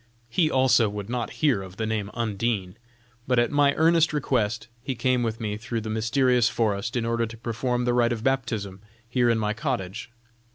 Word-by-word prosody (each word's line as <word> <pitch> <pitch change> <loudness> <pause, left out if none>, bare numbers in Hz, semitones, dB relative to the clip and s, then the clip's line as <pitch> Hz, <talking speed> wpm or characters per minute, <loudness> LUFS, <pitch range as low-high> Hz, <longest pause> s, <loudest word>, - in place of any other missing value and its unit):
He 155 +5 +2
also 130 -5 +4
would 105 +1 -6
not 125 -2 -2 0.2
hear 130 -10 +3
of 95 0 -10
the 110 - -1
name 110 -2 -2
of - - -17
Undine, 105 -4 -1 0.5
but 125 -1 +2
at 120 +3 +3
my 145 -1 +3
earnest 165 0 +4
request 120 -8 0
he 130 +1 -3
came 130 +1 +1
with 115 -1 -2
me 105 -2 -3
through 115 +1 -4
the 110 0 -5
mysterious 120 +2 +2
forest 110 0 -1
in 120 -2 0
order 115 0 0
to 115 +1 -10
perform 120 +2 -2
the 120 - +2
rite 120 -1 +3
of 115 -2 -3
baptism 115 -8 -1 0.3
here 120 0 +2
in 115 - +3
my 105 -1 0
cottage. 115 -4 -3
115 Hz, 200 wpm, -25 LUFS, 110-125 Hz, 0.5 s, also